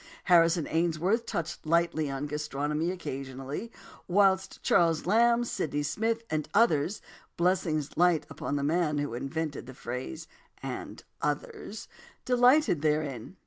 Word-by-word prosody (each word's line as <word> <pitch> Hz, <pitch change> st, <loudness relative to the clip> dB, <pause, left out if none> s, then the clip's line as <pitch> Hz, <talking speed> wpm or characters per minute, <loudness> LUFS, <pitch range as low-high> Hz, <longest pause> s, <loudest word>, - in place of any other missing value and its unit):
Harrison 170 Hz, -2 st, +4 dB
Ainsworth 175 Hz, +7 st, +1 dB
touched 165 Hz, -1 st, -4 dB
lightly 165 Hz, -2 st, +1 dB
on 135 Hz, +1 st, -3 dB
gastronomy 150 Hz, +2 st, -2 dB
occasionally, 140 Hz, -, -5 dB, 0.4 s
whilst 190 Hz, 0 st, +2 dB
Charles 165 Hz, -2 st, +3 dB
Lamb, 235 Hz, +5 st, +4 dB
Sydney 145 Hz, -10 st, -2 dB
Smith, 225 Hz, +9 st, -1 dB
and 155 Hz, -1 st, -1 dB
others 200 Hz, -4 st, +3 dB, 0.3 s
(blessings 170 Hz, -4 st, 0 dB
light 175 Hz, -2 st, +3 dB, 0.2 s
on 145 Hz, -, -1 dB
the 140 Hz, -, -1 dB
man 155 Hz, 0 st, +1 dB
who 145 Hz, -3 st, -2 dB
invented 140 Hz, +1 st, -4 dB
the 130 Hz, -, -10 dB
phrase 130 Hz, +8 st, -6 dB, 0.4 s
"and -, -, -6 dB, 0.2 s
others") 460 Hz, -4 st, -4 dB, 0.4 s
delighted 250 Hz, -, +4 dB
therein. 150 Hz, -, -1 dB
160 Hz, 120 wpm, -29 LUFS, 145-190 Hz, 0.4 s, Harrison